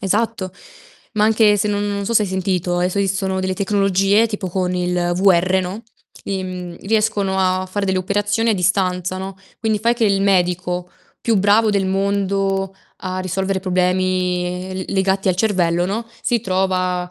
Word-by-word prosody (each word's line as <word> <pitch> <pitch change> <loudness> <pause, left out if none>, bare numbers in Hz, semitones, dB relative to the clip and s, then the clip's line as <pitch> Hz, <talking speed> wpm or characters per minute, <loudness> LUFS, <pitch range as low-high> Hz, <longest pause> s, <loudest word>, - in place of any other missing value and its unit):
Esatto. 205 0 -1 0.6
Ma 210 -1 +3
anche 215 -1 +4
se 210 - 0
non 205 0 -1
non 200 -1 -2
so 230 - -1
se 215 - +5
hai 205 - -2
sentito, 185 -1 -1
adesso 180 +2 0
esistono 195 -1 0
delle 185 0 -1
tecnologie 195 +2 +2
tipo 210 -4 -4
con 180 0 -1
il 180 -1 0
VR, 185 0 +3
no, 185 +5 -5 0.4
im 185 -2 -4
riescono 210 -2 0
a 185 0 +1
fare 200 +2 -3
delle 190 -1 +1
operazioni 205 +4 0
a 225 - +3
distanza, 185 -1 0
no, 190 0 -6 0.2
quindi 220 -1 0
fai 230 +3 +2
che 235 - 0
il 195 -2 +2
medico 180 -2 0 0.3
più 230 -2 +1
bravo 205 +3 +4
del 200 -2 +1
mondo 195 0 0 0.3
a 185 0 -3
risolvere 190 +1 -2
problemi, 180 0 0
ehm, 185 - -5
l - - -4
legati 190 0 +1
al 180 - +2
cervello, 175 -4 +1
no, 220 +5 -3 0.2
si 240 -1 +1
trova 185 -2 -1
190 Hz, 170 wpm, -19 LUFS, 185-200 Hz, 0.6 s, se